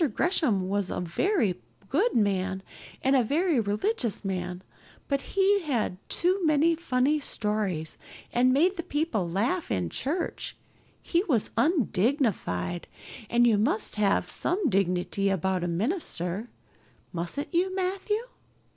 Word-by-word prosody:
Gresham 250 - +2
was 200 -1 0
a - - -2
very 185 - 0 0.3
good 385 - +1
man 190 -2 +1 0.4
and 265 +1 +4
a 255 - +4
very 310 - +2
religious 220 - -1
man, 180 -1 -3 0.4
but 275 -1 0 0.2
he 395 0 +4
told 240 - -1
too 370 +2 +1
many 315 +1 +4
funny 295 -2 +1
stories 210 - -2 0.3
and 250 +1 +4
made 350 +8 +3
the - - -1
people 295 - -1
laugh 235 - 0
in 90 -3 -1
church; 325 +6 -3 0.5
he 345 +1 +1
was 245 - +1
undignified, 225 - +1 0.4
and 240 0 +4
you 220 -4 +4
must 305 - 0
have 205 -2 +2
some 360 -4 0
dignity 195 0 +1
about 190 -1 0
a - - 0
minister, 200 - -2 0.6
mustn't 175 - -4
you, 370 +2 +1
Matthew? 385 +4 -1
240 Hz, 130 wpm, -27 LUFS, -, 0.6 s, and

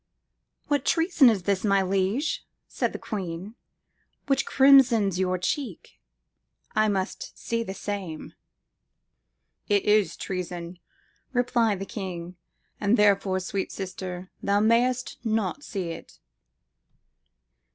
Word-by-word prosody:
"What 285 -3 +1
treason 325 -6 +4
is 205 -5 0
this, 195 0 0
my 200 -2 +3
liege," 195 - 0 0.2
said - - -1
the - - -5
queen, 190 -1 -5 0.7
"which 275 -1 +1
crimsons 240 -9 +5
your 185 -1 +1
cheek? 215 - -4 0.8
I 215 0 +4
must 195 -1 -3
see 230 0 -2
the 195 -4 -5
same.""It 195 -6 -5 1.5
is 210 -1 +3
treason," 175 -1 -5 0.5
replied 240 -4 +2
the 195 - -5
king, 180 -4 -6 0.4
"and 210 +3 +3
therefore, 200 -2 +3
sweet 190 +1 -3
sister, 185 -1 -6
thou 200 0 +2
mayest 240 +3 +2
not 220 +2 -1
see 195 -11 -4
it." - - -10
200 Hz, 110 wpm, -26 LUFS, 185-230 Hz, 1.5 s, crimsons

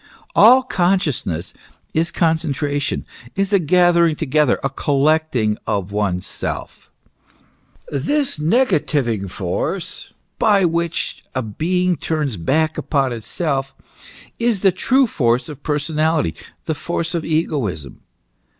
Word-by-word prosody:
" - - -30
All 255 +4 +8
consciousness 175 - 0 0.4
is 165 +2 +1
concentration, 145 -5 -1 0.3
is 195 +1 0
a 200 - +6
gathering 170 -1 +4
together, 150 -3 +1
a 135 - +1
collecting 140 -6 +1
of 100 -1 -1
oneself. 100 -3 -3 1.0
This 245 - -1
negativing 150 - +1
force 90 -1 -3 0.3
by 205 -4 +4
which 170 0 -1
a 130 - 0
being 180 - 0
turns 150 -5 -2
back 155 - 0
upon 135 -4 0
itself, 135 +4 -2 0.6
is 230 -5 +1
the 195 - +5
true 265 +8 +3
force 125 - +1
of 145 -3 -9
personality, 155 - 0 0.3
the 160 - 0
force 165 +2 -3
of 170 -2 -1
egoism." 135 - -2
155 Hz, 110 wpm, -20 LUFS, 130-175 Hz, 1.0 s, All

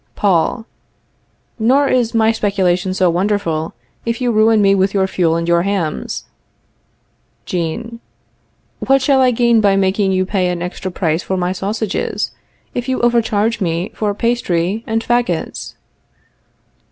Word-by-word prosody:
Paul. 200 +3 +1 0.9
Nor 265 +6 +3
is 240 -3 +1
my 220 0 +4
speculation 190 -4 0
so 185 -1 +3
wonderful, 175 -4 -1 0.3
if 230 +1 -2
you 245 -2 +1
ruin 220 0 +4
me 195 -1 +4
with 195 +1 +1
your 190 -1 +3
fuel 175 -3 +1
and 170 0 -2
your 170 0 +3
hams. 185 -5 -2 1.2
Jean. 205 +7 -4 0.8
What 270 0 +2
shall 270 -1 +3
I 255 - +5
gain 235 -1 +3
by 200 -2 +3
making 195 0 +1
you 185 0 +1
pay 185 -2 0
an 175 -1 -2
extra 180 +1 -5
price 165 -2 -1
for 190 - -3
my 180 0 0
sausages, 200 +2 -2 0.4
if 245 +1 -3
you 260 - 0
overcharge 230 -2 +1
me 170 +2 -1
for 210 -2 -2
pastry 210 -4 0
and 225 0 -1
fagots? 240 -9 -2
200 Hz, 140 wpm, -17 LUFS, 180-230 Hz, 1.2 s, I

